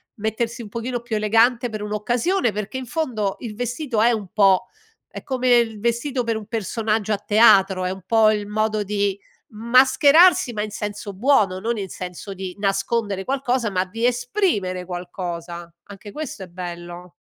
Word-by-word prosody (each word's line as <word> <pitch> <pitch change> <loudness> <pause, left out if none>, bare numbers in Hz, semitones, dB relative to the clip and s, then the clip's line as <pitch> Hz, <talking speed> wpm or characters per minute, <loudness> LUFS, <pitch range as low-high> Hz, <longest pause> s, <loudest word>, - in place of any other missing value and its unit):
mettersi 225 +3 -3
un 210 - -9
pochino 235 +2 -4
più 235 -2 -4
elegante 230 +3 +2
per 215 -1 -6
un'occasione, 240 - 0
perché 210 +4 -5
in 260 - -5
fondo 230 -8 -2
il 220 -4 -7
vestito 245 0 -2
è 235 +2 +5
un 215 -4 -3
po' 195 -3 +4 0.4
è - - -8
come 255 -1 -1
il 225 -3 0
vestito 235 +3 -1
per 230 -1 -1
un 215 - -8
personaggio 220 0 -1
a 205 - 0
teatro, 195 -4 +4
è - - 0
un 190 -1 -8
po' 220 0 +4
il 210 -1 -2
modo 215 0 0
di 200 -1 -1 0.3
mascherarsi 260 +6 +5
ma 210 - -2
in 215 - -3
senso 205 -1 -6
buono, 205 -5 +2
non 230 +5 -2
in 195 - -5
senso 180 +2 -7
di 185 -1 -6
nascondere 195 0 -1
qualcosa, 255 -4 -1
ma 185 0 0
di 225 +5 -3
esprimere 245 - 0
qualcosa, 175 -1 -6
anche 205 +1 -11
questo 285 -9 -6
è - - -9
bello. 175 0 -8
215 Hz, 170 wpm, -22 LUFS, 195-240 Hz, 0.4 s, è